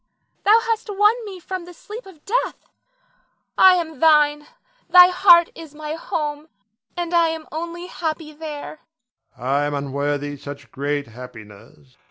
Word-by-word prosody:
Thou 425 +3 +6
hast 455 -1 -2
won 415 +1 +4
me 385 -3 -8
from 370 +1 -6
the 355 0 -13
sleep 455 0 -10
of 325 -6 -16
death, 480 +5 0 1.0
I 375 -1 +7
am 320 -5 -4
thine, 295 -2 +4 0.4
thy 360 0 +9
heart 350 -2 +6
is 320 -3 -12
my 305 0 -5
home, 300 -2 -4 0.5
and 350 0 -3
I 340 -1 +4
am 320 -1 -4
only 340 +2 -5
happy 320 -3 -4
there. 305 0 -8 0.6
Adrian. 125 - -8
I 140 +1 +2
am 145 - -2
unworthy 145 +1 -3
such 145 +1 -10
great 145 +1 -2
happiness. 105 - -14
315 Hz, 150 wpm, -21 LUFS, -, 1.0 s, thy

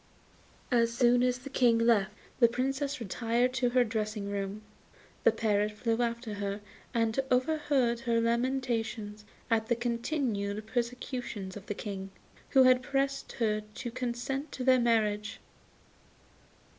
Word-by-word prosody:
As 235 -1 +3
soon 245 0 +4
as 250 0 +2
the 265 +2 -10
King 240 -3 +4
left, 230 -4 +3 0.3
the 235 - +7
Princess 270 +4 -2
retired 235 +3 0
to 250 -1 +1
her 250 0 +4
dressing 215 -2 -3
room, 200 +1 -4 0.6
the - - +6
parrot 210 -2 +1
flew 225 +2 -1
after 235 -1 -2
her 200 0 -3 0.3
and 230 0 +1
overheard 255 -2 +2
her 235 -2 +1
lamentations 230 -3 -1 0.3
at 220 -1 +2
the 235 - +2
continued 235 -4 -2
persecutions 235 -4 -4
of 205 0 -10
the 205 - -3
King, 195 -2 -5 0.4
who 265 - +6
had 255 0 +5
pressed 275 0 -1
her 215 -3 0
to 240 -2 -5
consent 255 +4 -3
to 255 - -4
their 255 0 +5
marriage. 215 -3 +1
235 Hz, 135 wpm, -30 LUFS, 215-250 Hz, 0.6 s, the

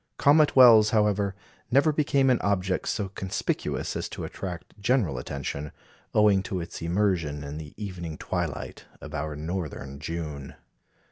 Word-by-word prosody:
Comet 150 +1 +5
Wells, 115 -5 +8
however, 105 -3 +1 0.3
never 140 +5 +4
became 140 -3 +3
an 125 - +2
object 95 -2 0
so 105 -4 -1
conspicuous 95 -1 -3
as - - -3
to - - -6
attract 90 -3 -6
general 100 - +1
attention, 70 +3 -5 0.4
owing 105 -2 +5
to 95 0 -4
its 85 - -7
immersion 85 -5 0
in 70 +2 -6
the 75 -2 -10
evening 90 -6 -6
twilight - - -4
of 75 - -10
our 75 0 -3
northern 75 -4 -5
June. 75 -3 -5
95 Hz, 140 wpm, -27 LUFS, 75-105 Hz, 0.4 s, Wells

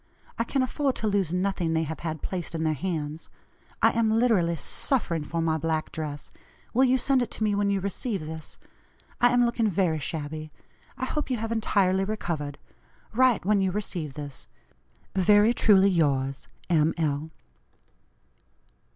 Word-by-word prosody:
I - - +3
can 265 +3 0
afford 270 +1 0
to 220 - -2
lose 200 -5 +1
nothing 180 -2 0
they 160 0 +1
have 160 0 -5
had 160 -2 -5
placed 175 -3 -4
in 160 - -1
their 155 -1 +2
hands. 155 -1 -4 0.5
I - - +7
am 230 -1 +1
literally 220 -7 +3
suffering 165 - -1
for 165 +2 -2
my 160 -1 +1
black 160 0 -1
dress. 150 -3 -6 0.4
Will 260 +3 +5
you 260 0 +4
send 260 +1 +2
it 240 - -1
to - - -3
me 210 -1 +2
when 200 0 +1
you 200 -1 +1
receive 195 -1 -3
this? 160 0 -7 0.6
I 245 - +6
am 245 0 +4
looking 235 -2 +1
very 175 -4 +1
shabby. 155 +1 -4 0.5
I 255 - -2
hope 300 +2 -3
you 255 - 0
have 225 +1 -4
entirely 195 -4 +2
recovered. 165 -8 -3 0.6
Write 250 -5 +3
when 205 0 +3
you 190 -1 +1
receive 175 -8 -3
this. 145 -2 -7 0.7
"Very 205 +4 +5
truly 200 -4 +5
yours, 140 -5 0 0.2
M. 160 -2 +2
L." 155 -1 -1
185 Hz, 165 wpm, -26 LUFS, 160-220 Hz, 0.7 s, I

